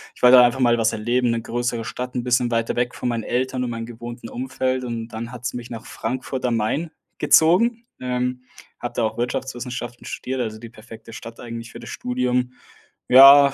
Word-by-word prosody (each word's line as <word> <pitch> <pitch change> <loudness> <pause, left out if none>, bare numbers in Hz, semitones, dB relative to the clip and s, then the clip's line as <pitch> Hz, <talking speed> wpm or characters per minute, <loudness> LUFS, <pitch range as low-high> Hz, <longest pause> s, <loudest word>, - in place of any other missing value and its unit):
ich - - -19
wollte 125 0 +9
einfach 125 +2 +3
mal 120 -1 +4
was 115 0 +2
erleben. 120 +2 +1
'Ne 115 - -1
größere 120 0 -2
Stadt, 125 +3 -5
'n 125 - -1
bisschen 125 -1 +2
weiter 115 0 -1
weg 120 0 0
von 125 - -2
meinen 115 -1 -2
Eltern 130 +2 -1
und - - -3
meinen 115 -1 -4
gewohnten 120 0 -8
Umfeld 130 0 -2
und 115 -1 -4
dann 115 +2 -6
hat 125 -1 -9
es 125 - -2
mich 120 -1 -7
nach 115 -2 -8
Frankfurt 130 +2 -4
am 120 -2 +1
Main 130 +10 -1 0.3
gezogen. 230 +9 +4
Ähm, 125 0 -2 0.4
habe 120 0 -5
da 120 - +1
auch 110 0 -1
Wirtschaftswissenschaften 120 0 -4
studiert, 130 0 -4
also, 110 -3 -3
die 115 - -9
perfekte 115 0 -13
Stadt 115 +1 -9
eigentlich 115 -1 -7
für 115 - -9
das 115 - -9
Studium. 125 0 -1 0.6
Ja, 140 +2 +9
120 Hz, 200 wpm, -22 LUFS, 115-125 Hz, 0.6 s, wollte